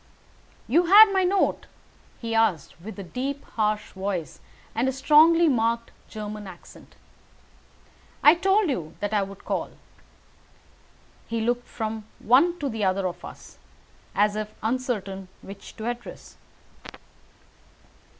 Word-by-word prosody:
"You 335 +9 +3
had 415 +3 +9
my 380 -1 +3
note?" 385 +2 +1 0.5
he 230 -1 -4
asked, 205 -9 0
with 215 +4 -9
a 200 - -6
deep, 270 +9 -4
harsh 215 -1 -2
voice 190 -6 -4 0.3
and 235 +4 0
a - - +2
strongly 315 +5 +5
marked 230 -3 0 0.2
German 210 -1 -7
accent. 180 -2 -14 1.3
"I 295 - +9
told 390 +3 +2
you 165 -11 -5
that 205 +1 -3
I 210 - +3
would 195 0 -8
call." - - -2 1.6
He 230 - -2
looked 240 +2 -1
from 220 -1 -5
one 305 +10 +3
to 290 - -3
the 220 -4 -3
other 190 0 +1
of 175 0 -7
us, - - -12 0.6
as 205 +1 +2
if 215 0 -5
uncertain 220 -6 -2 0.2
which 195 0 -11
to 220 - -7
address. 240 0 -7
225 Hz, 130 wpm, -25 LUFS, 200-270 Hz, 1.6 s, had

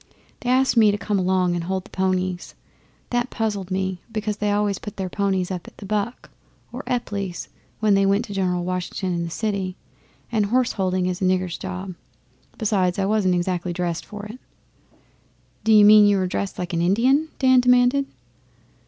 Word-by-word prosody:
They 245 - -4
asked 260 +1 +3
me 220 -2 +6
to 205 - +1
come 205 -1 -1
along 185 -1 +1
and 170 -1 -3
hold 190 +1 -2
the - - -16
ponies. 185 -1 -1 0.6
That 245 +1 0
puzzled 205 -4 -3
me, 190 -1 -2
because 215 -1 -2
they 210 0 0
always 205 -1 0
put 210 - -9
their 190 -1 -3
ponies 190 -2 -1
up 180 -2 -5
at - - -14
the 205 - -9
"Buck" 210 +4 -3 0.4
or - - -5
Epply's 200 -7 -3 0.3
when 215 -2 +4
they 195 0 +3
went 200 +4 +2
to 205 - -8
see - - -5
General 180 -2 0
Washington 180 +1 -3
in 170 0 -1
the - - -5
city, 195 0 -2 0.6
and 215 -3 +1
horse 250 +3 +2
holding 185 -2 0
is 180 0 -2
a - - +2
nigger's 185 -1 +1
job. 185 0 -5 0.6
Besides, 190 -5 +1
I 195 - +1
wasn't 195 -3 +2
exactly 175 0 -1
dressed 175 -1 -2
for 210 0 -8
it.' 220 +4 -9 1.3
'D'you 215 -2 +7
mean 210 0 +8
you 205 -1 +3
were 190 - 0
dressed 190 +1 -3
like 180 -1 -4
an 170 - 0
Indian?' 250 - +3
Dan 260 -1 +5
demanded. 250 +2 +3
195 Hz, 190 wpm, -23 LUFS, 185-215 Hz, 1.3 s, mean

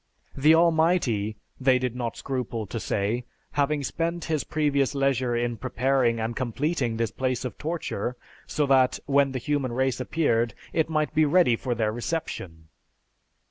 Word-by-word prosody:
The 150 +4 +5
Almighty,' 160 - +2 0.2
they 130 -1 +4
did 125 -1 -2
not 120 -2 -3
scruple 125 -4 -3
to 115 +3 -5
say, 105 +4 -1 0.3
'having 145 0 0
spent 170 +4 -2
his 155 -3 0
previous 145 -3 0
leisure 130 -3 +1
in 120 0 -1
preparing 130 -1 +1
and 115 +1 -2
completing 130 0 -1
this 115 -1 -1
place 130 -1 -2
of 125 - -4
torture, 150 -7 -3 0.3
so 150 - 0
that, 135 -2 +4
when 140 -1 +3
the 130 - -3
human 135 -1 -1
race 130 0 0
appeared, 125 -5 +1 0.2
it 160 -1 +1
might 155 -1 0
be 155 0 +4
ready 150 -5 +4
for 120 +1 -2
their 110 -2 0
reception.' 95 - -5
130 Hz, 155 wpm, -26 LUFS, 120-150 Hz, 0.3 s, The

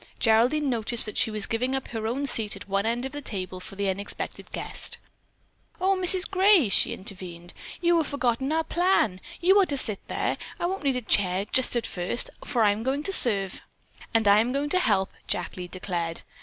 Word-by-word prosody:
Geraldine 245 +7 +2
noticed 235 -2 +3
that 215 - -5
she - - +2
was 215 -2 -1
giving 250 +4 -2
up 265 - -5
her 220 -2 -4
own 265 +5 -2
seat 225 -6 +3
at - - -11
one 200 +2 -1
end 240 +2 -2
of 265 - -5
the 290 - -7
table 185 -7 -3
for 195 +2 -11
the 200 0 -2
unexpected 195 +2 -5
guest. - - -4 0.8
"Oh, 385 +2 +2
Mrs. 370 0 +6
Gray," 380 - +4
she - - +5
intervened. 180 -3 -9 0.3
"You 345 -1 +3
have 320 -3 0
forgotten 265 0 -1
our 320 +1 0
plan. 335 - 0 0.2
You 380 +3 +5
are - - +3
to 285 - -1
sit 215 -6 +1
there. - - -2 0.2
I - - -2
won't 380 0 -3
need 275 -2 +1
a 250 - -4
chair 195 -2 +1
just 255 +3 +1
at 240 - -1
first, 180 +7 0
for 240 -5 0
I 205 - +4
am 205 +2 -4
going 270 +5 -2
to 390 - -2
serve." 200 - +4 0.5
"And 225 -2 +1
I 200 +1 +6
am 235 +3 0
going 280 +2 -2
to 365 - +2
help," 200 - 0 0.2
Jack - - -3
Lee 180 -1 -7
declared. 175 -2 -5
230 Hz, 210 wpm, -25 LUFS, 200-290 Hz, 0.8 s, Mrs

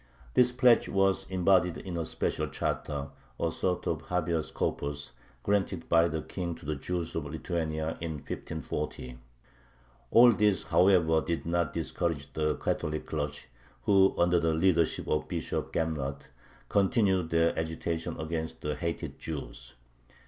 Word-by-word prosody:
This 125 -1 +5
pledge 125 -2 +4
was 95 -1 +2
embodied 95 -1 +3
in 90 -2 -6
a 85 -1 -2
special - - -1
charter, 70 -1 -3 0.3
a - - 0
sort 90 -1 -1
of 80 -1 -1
habeas 85 -3 0
corpus, 70 0 -3 0.3
granted 100 -3 0
by 85 0 +5
the 80 -2 -3
King 85 -3 -4
to - - -14
the 75 +1 -1
Jews 85 +3 -3
of 80 - -3
Lithuania 80 0 -3
in 80 -1 -3
1540. 70 -3 -5 0.9
All 120 - +8
this, 105 -4 +2
however, 85 -4 +4
did 85 0 -3
not 85 -3 0
discourage 70 -5 -2
the 75 -1 0
Catholic 75 0 -2
clergy, 75 -2 -3 0.4
who, 95 -1 +5
under 85 0 +4
the 80 -1 +1
leadership 85 -1 +2
of 75 - 0
Bishop - - -3
Gamrat, 70 -4 -2 0.4
continued 95 -3 +2
their 85 0 +2
agitation 80 +1 -3
against 80 0 -4
the 75 - -2
hated 85 +3 -4
Jews. 75 -5 -7
80 Hz, 140 wpm, -29 LUFS, 75-90 Hz, 0.9 s, All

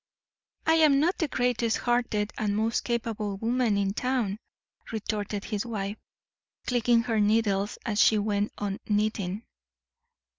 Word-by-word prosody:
"I 320 0 +4
am 300 -4 +5
not 340 +6 +1
the 320 - +1
greatest 245 -3 0
hearted 235 -4 0
and 205 -1 -1
most 225 +1 0
capable 225 -4 -2
woman 230 0 +1
in 195 -1 0
town," 235 -4 -1 0.5
retorted 210 -2 -3
his 210 -2 -2
wife, 210 -3 -4 0.7
clicking 240 -1 +3
her 225 -3 0
needles 205 -1 +1
as 215 -4 +1
she 215 - +5
went 205 0 0
on 200 -1 -3
knitting. 210 -1 -1
220 Hz, 135 wpm, -27 LUFS, 205-240 Hz, 0.7 s, am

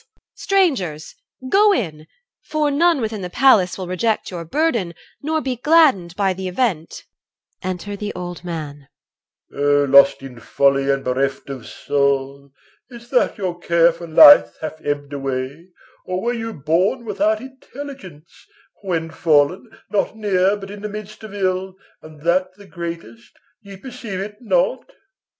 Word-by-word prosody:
EL. - - -33
(loudly). - - -55 0.2
Strangers, 195 - 0 0.3
go 410 +8 +5
in! 160 - -2 0.3
For 305 -1 -1
none 325 0 +3
within 220 -2 -3
the 180 - -5
palace 210 -5 +4
will 190 - -5
reject 210 +5 -1
Your 175 -2 -5
burden, 230 - -1 0.3
nor 315 +2 -1
be 260 -3 -3
gladdened 265 - +3
by 195 -1 +1
the 190 0 -5
event. 180 -5 -2 0.6
Enter 185 +2 -4
the 210 +1 -5
Old 175 -1 -7
Man. 150 -5 -7 0.7
OLD - - -5
M. - - +1
O 145 0 +4 0.2
lost 140 -1 +2
in 125 -3 -10
folly 140 +3 +1
and 135 0 +1
bereft 135 +2 -2
of 130 -3 -8
soul! 140 -1 -1 0.4
Is't 235 -1 -13
that 250 - +2
your 180 -4 -3
care 170 0 +3
for 170 +1 -10
life 290 - +8
hath 155 0 -7
ebbed 145 0 -3
away, 135 +3 -4 0.4
Or 185 0 -2
were 240 +1 0
you 225 -1 -4
born 175 - 0
without 215 +1 0
intelligence, 260 - -11 0.3
When 165 -4 -3
fallen, 160 - +1 0.2
not 210 +1 0
near, 200 -1 +1
but 195 -1 -9
in 205 0 -9
the 210 - -5
midst 210 +1 -9
of 215 - -9
ill, 185 -1 -2 0.3
And 155 -1 -14
that 185 +2 +1
the 205 0 -15
greatest, 170 - -8 0.2
ye 200 -2 -12
perceive 230 -4 -7
it 205 +2 -6
not? - - 0
185 Hz, 160 wpm, -20 LUFS, 155-225 Hz, 0.7 s, life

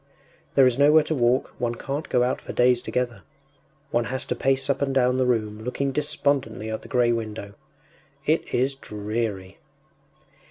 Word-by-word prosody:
There 135 - +7
is 125 +1 +2
nowhere 150 +2 +6
to 155 - -2
walk; 125 -2 +1
one 120 -1 -1
can’t 140 +6 -4
go 125 - +3
out 125 - -1
for - - -7
days 125 0 +3
together; 120 -5 -2 0.7
one 120 0 +1
has 130 +2 -3
to - - -2
pace 135 0 +1
up 140 -1 0
and 135 -1 0
down 125 0 +3
the 130 - +2
room, 110 -3 -1
looking 135 +3 -1
despondently 140 -5 -1
at 110 - -4
the - - -12
grey 120 -2 +2
window. 110 -3 -4 0.7
It - - +1
is 130 +3 +1
dreary! 105 -5 -4
125 Hz, 170 wpm, -24 LUFS, 115-135 Hz, 0.7 s, There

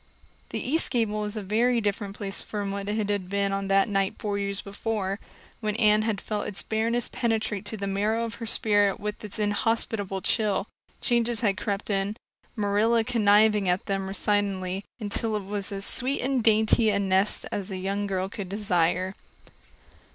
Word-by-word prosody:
The - - -3
east 320 +6 0
gable 220 -4 0
was 210 +1 -3
a 210 - -3
very 235 +5 +2
different 205 -1 -2
place 195 -2 -2
from 205 -2 -4
what 200 0 -4
it 210 - 0 0.2
had 195 -3 -2
been 200 0 0
on 195 0 -2
that 195 +1 +4
night 195 -2 0
four 205 -1 -2
years 200 0 -1
before, 200 -1 -3 0.4
when 215 -2 -1
Anne 215 -2 +5
had 215 -2 -1
felt 210 -1 -3
its 200 - -5
bareness 230 +2 +1
penetrate 220 -5 -1
to 220 - -4
the 200 - -3
marrow 210 +4 0
of 230 - -5
her 230 - -3
spirit 205 -3 +2
with 210 +1 -5
its 210 -1 -6
inhospitable 205 -2 0
chill. 205 -1 +1 0.4
Changes 235 -1 +2
had 205 -4 +2
crept 205 +1 -3
in, 200 +2 -1 0.4
Marilla 215 +2 +2
conniving 210 -3 +4
at 180 +1 0
them 195 -1 -1
resignedly, 195 -1 0 0.2
until 215 +1 -1
it 210 - -2
was 200 0 -3
as 195 0 -3
sweet 260 +2 +1
and 260 -2 0
dainty 220 0 +5
a 205 - +2
nest 195 +1 +1
as 200 0 -3
a 190 - -4
young 200 +2 -2
girl 190 -1 -1
could 195 -1 -6
desire. 185 -2 +1
205 Hz, 180 wpm, -26 LUFS, 195-220 Hz, 0.4 s, Anne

